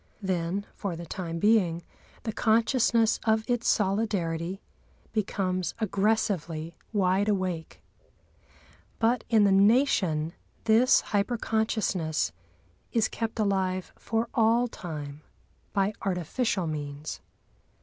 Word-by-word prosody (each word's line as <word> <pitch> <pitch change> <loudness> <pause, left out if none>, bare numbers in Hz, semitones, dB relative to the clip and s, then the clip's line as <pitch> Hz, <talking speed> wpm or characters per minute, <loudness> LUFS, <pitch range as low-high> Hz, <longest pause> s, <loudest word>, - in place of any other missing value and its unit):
Then, 185 +1 -1
for 195 -4 -4
the 170 +1 -7
time 170 -2 -5
being, 180 -4 +3 0.4
the 220 - -3
consciousness 230 0 +3
of 220 0 +1
its 240 -1 0
solidarity 190 -4 0 0.5
becomes 185 -4 -1
aggressively 195 -6 0 0.2
wide 200 0 +2
awake. 185 -5 -2 1.1
But 230 +1 +2
in 220 -3 +5
the 200 - +4
Nation 195 - +3 0.3
this 230 +3 +5
hyper 210 +3 0
consciousness 200 - 0 0.6
is 225 -2 +2
kept 225 0 -4
alive 190 -3 0
for 225 +1 -2
all 230 +1 +3
time 150 -8 -7 0.5
by 200 +1 +1
artificial 190 +2 -1
means. 150 -1 -5
195 Hz, 100 wpm, -28 LUFS, 170-220 Hz, 1.1 s, in